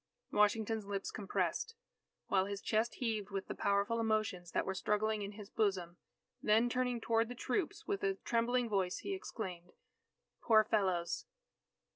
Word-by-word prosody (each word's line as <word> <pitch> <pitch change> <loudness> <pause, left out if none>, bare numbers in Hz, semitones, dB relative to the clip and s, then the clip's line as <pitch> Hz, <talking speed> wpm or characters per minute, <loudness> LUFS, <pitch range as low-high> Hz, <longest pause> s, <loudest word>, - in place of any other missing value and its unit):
Washington's 210 0 +2
lips 200 -1 -3
compressed, 200 - -1 0.5
while 190 -1 +2
his 200 -1 -3
chest 220 +3 0
heaved 220 -5 -2
with 195 -1 -3
the - - -3
powerful 200 +3 +1
emotions 215 -6 0
that - - 0
were 190 - -1
struggling 210 +2 0
in 200 +1 -4
his 205 -1 -10
bosom. 185 -5 0 0.4
Then 220 +3 +4
turning 250 -1 0
toward 225 0 +1
the 245 - -5
troops, 290 +8 -2
with 405 -1 -1
a 390 -1 +2
trembling 240 -3 +1
voice, 190 -4 0
he 395 - -1
exclaimed: 185 - -6 0.7
"Poor 220 -2 +6
fellows!" 190 -5 0
215 Hz, 150 wpm, -35 LUFS, 195-230 Hz, 0.7 s, Poor